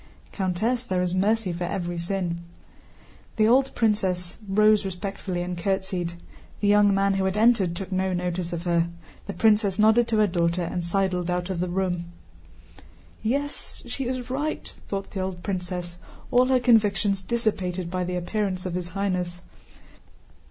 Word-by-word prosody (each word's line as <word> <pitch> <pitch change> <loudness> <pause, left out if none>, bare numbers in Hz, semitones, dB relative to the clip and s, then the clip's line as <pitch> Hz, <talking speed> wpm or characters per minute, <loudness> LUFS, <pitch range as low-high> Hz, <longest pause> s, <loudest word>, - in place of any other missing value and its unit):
* - - -28
"Countess, 215 +6 0
there 185 -6 0
is 180 -1 -1
mercy 200 0 +1
for 175 +1 -3
every 175 -2 -3
sin." 175 -1 -2 1.0
The 215 -1 +4
old 265 +3 +4
princess 190 -5 0
rose 210 +1 +5
respectfully 190 -1 -4
and 180 0 -3
curtsied. 190 -1 -1 0.5
The 205 - +1
young 205 0 +6
man 195 0 +2
who 195 0 0
had 190 +2 0
entered 215 -6 +4
took 190 +2 -6
no 190 0 0
notice 180 -1 -2
of 170 -1 -4
her. 170 -1 +2 0.4
The 200 - -3
princess 210 -3 +3
nodded 220 +2 +5
to 225 -2 +1
her 215 - +5
daughter 170 -1 +1
and 175 +1 -3
sidled 180 0 0
out 180 +1 -1
of 180 - -3
the 180 0 -1
room. 175 -1 -1 1.2
"Yes, 280 +6 -2
she 270 - -4
is 250 0 -3
right," 295 +4 -3
thought 195 -1 -4
the 195 - -4
old 185 -2 -4
princess, 180 -2 -4 0.3
all 250 +1 +5
her 260 -1 +4
convictions 210 -4 +3
dissipated 190 -5 -1
by 185 0 -1
the 180 0 -3
appearance 185 +1 -2
of 180 - -3
His 180 -1 -2
Highness. 180 -3 -1
190 Hz, 165 wpm, -25 LUFS, 180-215 Hz, 1.2 s, young